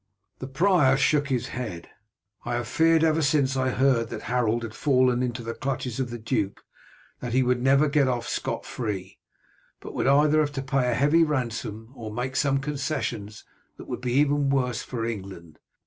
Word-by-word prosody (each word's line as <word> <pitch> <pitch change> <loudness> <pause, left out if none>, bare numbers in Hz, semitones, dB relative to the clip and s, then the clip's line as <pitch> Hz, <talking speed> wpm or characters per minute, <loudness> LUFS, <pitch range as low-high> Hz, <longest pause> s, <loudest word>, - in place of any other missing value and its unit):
The 130 - -6
prior 135 -2 +3
shook 145 +1 +2
his 130 -2 -1
head. 105 -9 -6 0.6
"I 120 0 -2
have 120 -1 -3
feared 165 +5 +3
ever 160 0 +3
since 140 -2 +2
I 130 0 +1
heard 125 -3 +2
that - - -6
Harold 120 -1 0
had 115 -1 -6
fallen 130 -2 +2
into 125 -1 -3
the 115 0 -4
clutches 130 -2 -3
of 130 -2 -1
the 120 - -5
duke, 110 -3 -2 0.6
that 120 -2 -5
he 130 +1 +3
would 125 0 +1
never 135 +3 +4
get 145 -2 +2
off 120 -2 -1
scot - - -3
free, 100 -5 -5 0.6
but - - -9
would - - -1
either 150 +2 +4
have 145 -1 0
to 135 -2 -3
pay 130 -2 +1
a 120 - +1
heavy 145 +6 +4
ransom 115 -6 -3
or 110 -3 -7
make 125 +4 -4
some 135 0 +2
concessions 135 -7 -3 0.3
that - - -11
would - - -5
be 125 -1 -2
even 145 0 +2
worse 125 -4 0
for 115 -3 -4
England. 95 -8 -7
130 Hz, 190 wpm, -25 LUFS, 115-140 Hz, 0.6 s, never